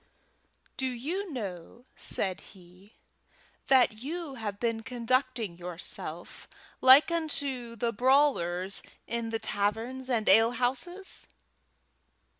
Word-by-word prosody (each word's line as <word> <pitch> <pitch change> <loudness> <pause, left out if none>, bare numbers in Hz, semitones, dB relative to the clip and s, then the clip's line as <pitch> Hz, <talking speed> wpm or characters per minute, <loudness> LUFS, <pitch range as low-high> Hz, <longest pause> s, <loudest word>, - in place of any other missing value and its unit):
"Do 265 - 0
you 320 +11 -4
know," 210 - -7
said 190 -2 -1
he, 185 +2 -17 0.7
"that 250 -5 +4
you 320 +2 -5
have 210 -5 -5
been 230 -2 -1
conducting 245 -5 -1
yourself 175 0 -7 0.3
like 265 +5 +8
unto 280 -7 -2
the 230 +1 -1
brawlers 205 -8 +2 0.2
in 235 -1 -3
the 225 - -1
taverns 225 +5 -2
and 230 -4 0
ale 225 +4 +6
houses?" 270 +11 -2
235 Hz, 100 wpm, -29 LUFS, 205-265 Hz, 0.7 s, like